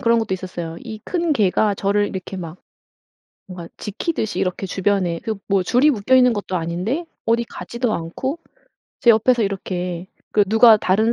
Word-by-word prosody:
그런 230 0 +3
것도 210 -4 -1
있었어요. 175 -3 -6
이 220 -3 -8
큰 345 -3 0
개가 210 -2 +2
저를 205 +1 +1
이렇게 190 +1 -6
막 170 -1 -7 0.9
뭔가 175 -2 -8
지키듯이 220 - -3
이렇게 185 +1 -1
주변에 185 -3 0
그 220 - -3
뭐 195 -2 +2
줄이 255 +10 +4
묶여있는 250 +2 +4
것도 200 -3 -3
아닌데 180 - -2 0.2
어디 230 +1 +2
가지도 235 -1 -3
않고 260 - -4 0.6
제 240 - +6
옆에서 230 +2 +3
이렇게 180 -3 -3 0.3
그 205 -1 +4
누가 220 +1 +7
다른 215 +4 +2
205 Hz, 335 characters per minute, -21 LUFS, 185-235 Hz, 0.9 s, 누가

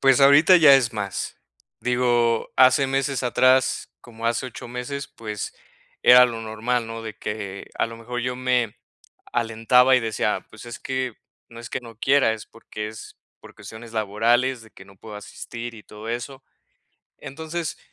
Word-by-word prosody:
Pues, 135 -1 +4
ahorita 145 +6 +7
ya 155 -5 +8
es 120 -4 0
más, 100 -3 -4 0.4
digo, 120 -2 +1
hace 130 +2 +5
meses 135 -1 -1
atrás, 130 +1 +2
como 115 -1 -7
hace 120 +2 0
8 120 -1 -9
meses, 125 +3 -5
pues, 105 -2 -6 0.5
era 125 0 +8
lo 115 -2 -5
normal, 115 +2 -2
¿no?, 115 0 -7
de 110 -1 -7
que 100 -2 -6
a - - +2
lo 115 0 -9
mejor 125 +2 -5
yo 125 +1 -3
me 125 -3 0 0.6
alentaba 120 +3 +3
y - - +4
decía, 110 -2 -2
pues, 110 +2 -13
es 120 -1 -8
que 130 -2 -3 0.4
no 115 - -12
es 120 - -9
que - - -4
no 115 -2 -13
quiera, 135 -4 +3
es 110 - -8
porque, 110 -2 -8
es 110 0 -11 0.2
por - - -14
cuestiones 110 +3 -11
laborales 115 +4 +1
de 110 -1 -17
que 95 - -15
no 100 0 -18
puedo 105 +2 -11
asistir 115 +3 -8
y 105 - -13
todo 105 +1 -11
eso. 130 +3 -5 0.8
Entonces, 160 +3 -5
120 Hz, 170 wpm, -23 LUFS, 110-130 Hz, 0.8 s, ya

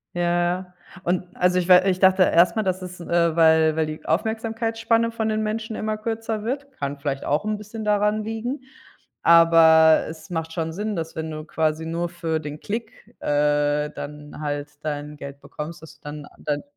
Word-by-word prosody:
Ja, 175 - -1
ja, 175 +1 0 0.3
und 180 +1 0
also 180 0 +3
ich 180 0 -1
wei 180 +1 +7
ich 185 - 0
dachte 190 0 +5
erst 170 +2 +4
mal, 220 - +2
das 185 -1 -1
ist, 180 0 -8
äh, 170 -1 +1
weil 160 -1 +5
weil 160 - +2
die 155 0 -7
Aufmerksamkeitsspanne 225 +4 0
von 220 -1 -2
den 215 0 0
Menschen 220 +1 -3
immer 215 0 -2
kürzer 225 0 -3
wird 275 +5 -3
kann 140 - -4
vielleicht 140 -1 -3
auch 150 +8 0
'n 215 0 -1
bisschen 215 +1 -8
daran 210 +1 +2
liegen, 225 +5 -4 0.6
aber 165 -1 +6
es 160 0 -10
macht 165 -2 -3
schon 160 -1 -3
Sinn, 210 +4 -3
dass, 165 -1 -4
wenn 160 0 -4
du 155 0 -6
quasi 160 0 -1
nur 170 +1 -2
für 165 -2 -2
den 150 -1 -7
Klick, 225 +2 -7
äh, 145 0 +1
dann 150 +1 -8
halt 145 -1 -3
dein 150 -1 -4
Geld 140 0 -9
bekommst, 155 +2 -8
dass 160 - -13
du - - -47
dann 150 0 -7
dein 145 -1 -2
170 Hz, 190 wpm, -23 LUFS, 155-215 Hz, 0.6 s, wei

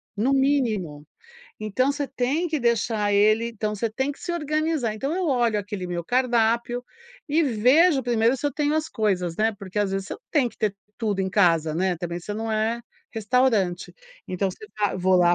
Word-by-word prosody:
No 230 +6 +1
mínimo. 225 - +1 0.5
Então, 215 +6 0
você 285 0 -2
tem 275 +7 -1
que 310 -4 -2
deixar 220 -3 +1
ele 215 +3 +3
então, 215 -2 -3
você 225 +2 -2
tem 265 +6 -1
que - - -18
se - - -5
organizar. 305 -7 -1
Então, 275 +8 -3
eu 365 -1 -1
olho 240 -6 +2
aquele 200 -3 -5
meu 175 -1 -3
cardápio 240 0 +1 0.4
e 320 +3 +3
vejo 270 +4 +4
primeiro 235 +1 +2
se 290 - -2
eu 285 - -1
tenho 295 0 0
as 315 +1 -1
coisas, 185 -6 -1
né, 220 +1 +2
porque 200 0 -3
às 200 - 0
vezes 195 0 -2
você - - -6
não - - -14
tem 275 -6 +2
que - - -19
ter 210 -3 -1 0.2
tudo 210 -4 -1
em 190 - 0
casa, 165 -6 +2
né. 185 +1 0
Também, 175 +1 -5
você 205 - -6
não 220 +1 -3
é 220 +2 0 0.3
restaurante. 220 -5 +1 0.4
Então, 190 +1 -1
você 215 - -13
va 205 -1 +1
vou 185 0 +3
lá 175 -1 +5
225 Hz, 200 wpm, -24 LUFS, 200-265 Hz, 0.5 s, lá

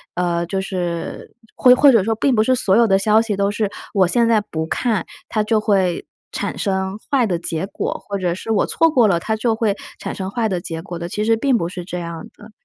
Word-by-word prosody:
呃， 175 -1 0
就 190 +3 -2
是 175 -3 -4 0.2
或 250 - +6
或 280 +2 +6
者 225 -6 +4
说 225 +3 0
并 255 +3 +1
不 215 - +3
是 255 - +2
所 195 -5 +2
有 235 +1 +5
的 195 -3 +3
消 215 +2 +4
息 225 -3 -2
都 200 0 +1
是 205 0 -2 0.2
我 195 -3 +4
现 235 +3 +2
在 225 -2 +3
不 160 -6 -4
看， 215 -1 -1 0.2
它 215 - 0
就 215 0 +1
会 190 -5 +1 0.3
产 - - -3
生 190 0 -2
坏 270 -4 +3
的 180 -5 -1
结 170 +1 -3
果， - - -3 0.2
或 200 - -1
者 180 -3 -1
是 225 - -5
我 215 - +2
错 330 - +2
过 245 -7 +4
了， 175 -4 +1
它 220 +3 -1
就 225 0 +1
会 215 -3 0 0.2
产 - - -5
生 190 -1 -5
坏 225 +2 -1
的 185 -3 -1
结 165 -1 -6
果 175 0 -7
的， 170 - -4
其 210 +4 -3
实 225 +1 +2
并 260 +1 +2
不 170 -5 -2
是 180 -1 -7
这 180 -1 -5
样 170 +3 -6
的。 210 +1 -15
200 Hz, 265 characters per minute, -20 LUFS, 180-225 Hz, 0.3 s, 或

